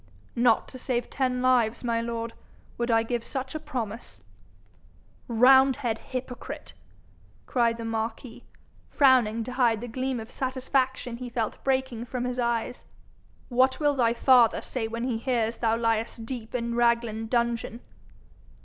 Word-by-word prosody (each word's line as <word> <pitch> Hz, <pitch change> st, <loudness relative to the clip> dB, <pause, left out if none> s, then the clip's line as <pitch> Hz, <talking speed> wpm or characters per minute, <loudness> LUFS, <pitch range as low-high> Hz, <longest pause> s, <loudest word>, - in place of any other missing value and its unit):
'Not 235 Hz, -1 st, +3 dB
to 255 Hz, -, -10 dB
save 245 Hz, -1 st, -2 dB
ten 255 Hz, -2 st, 0 dB
lives, 240 Hz, -3 st, +2 dB
my 230 Hz, -1 st, 0 dB
lord, 230 Hz, 0 st, -4 dB, 0.5 s
would 235 Hz, 0 st, -1 dB
I 225 Hz, -1 st, +4 dB
give 235 Hz, 0 st, -2 dB
such 260 Hz, +1 st, -4 dB
a 310 Hz, -, -3 dB
promise.' 235 Hz, -, -6 dB, 1.1 s
'Roundhead 255 Hz, 0 st, +4 dB
hypocrite!' 255 Hz, -1 st, -7 dB, 0.7 s
cried 235 Hz, -2 st, +1 dB
the 230 Hz, -, -6 dB
marquis, 225 Hz, +2 st, -4 dB, 0.5 s
frowning 245 Hz, -6 st, +4 dB
to 250 Hz, -, -6 dB
hide 240 Hz, -4 st, +2 dB
the 245 Hz, -, -6 dB
gleam 255 Hz, +1 st, -2 dB
of 225 Hz, +2 st, -9 dB
satisfaction 260 Hz, -2 st, -1 dB
he 250 Hz, 0 st, -6 dB
felt 235 Hz, -3 st, -3 dB
breaking 260 Hz, -3 st, -1 dB
from 250 Hz, 0 st, -4 dB
his 250 Hz, 0 st, -3 dB
eyes. 235 Hz, +1 st, -2 dB, 0.6 s
'What 260 Hz, +1 st, +3 dB
will 295 Hz, -1 st, +3 dB
thy 235 Hz, -3 st, +2 dB
father 245 Hz, -2 st, +5 dB
say 235 Hz, -4 st, -3 dB
when 230 Hz, +1 st, -4 dB
he 245 Hz, -3 st, -1 dB
hears 235 Hz, -2 st, -1 dB
thou 225 Hz, -1 st, +2 dB
liest 230 Hz, 0 st, -1 dB
deep 235 Hz, -1 st, -6 dB
in 235 Hz, -1 st, -2 dB
Raglan 235 Hz, -2 st, +1 dB
dungeon?' 235 Hz, 0 st, -1 dB
240 Hz, 145 wpm, -27 LUFS, 230-255 Hz, 1.1 s, father